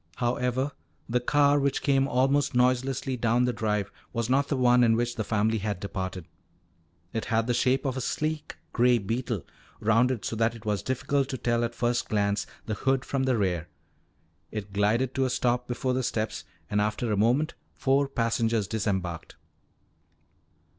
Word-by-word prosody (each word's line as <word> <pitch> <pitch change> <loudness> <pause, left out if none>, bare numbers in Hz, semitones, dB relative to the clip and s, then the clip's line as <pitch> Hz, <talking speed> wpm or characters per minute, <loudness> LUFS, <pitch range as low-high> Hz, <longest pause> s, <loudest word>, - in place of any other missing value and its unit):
However, 125 +3 0 0.4
the 125 +1 +1
car 145 +3 +3
which 140 -1 0
came 135 -1 +3
almost 135 +1 +2
noiselessly 130 +1 +1
down 120 +1 +2
the 125 - 0
drive 105 -2 -1 0.2
was 115 0 -1
not 140 +2 +3
the 140 - -1
one 125 -1 +5
in 115 -1 +4
which 120 +1 -1
the 110 - -2
family 110 +1 +1
had 100 -2 -3
departed. 95 -3 -4 0.9
It 115 - -2
had 115 -2 +1
the 120 - +1
shape 130 +3 +2
of 130 -2 -1
a 130 - -2
sleek 155 +3 -3 0.2
gray 125 0 +4
beetle, 115 - -3 0.3
rounded 115 +2 +2
so - - -2
that 115 +1 +1
it 110 - -12
was 105 -3 0
difficult 135 +3 0
to 130 - -3
tell 120 -1 0
at 120 0 -2
first 120 0 0
glance 100 -1 0 0.2
the 110 - -2
hood 135 +4 0
from 135 -1 -1
the 130 -2 +2
rear. 90 -5 0 0.8
It 100 -2 -6
glided 110 +6 +1
to 135 - +1
a - - 0
stop 125 0 0
before 125 +1 -1
the 130 - 0
steps 115 -3 -2 0.2
and 105 0 +1
after 110 +2 -1
a - - +2
moment 120 +9 +2 0.2
four 140 +1 +2
passengers 115 -4 0
disembarked. 95 -6 -2
120 Hz, 175 wpm, -27 LUFS, 110-130 Hz, 0.9 s, one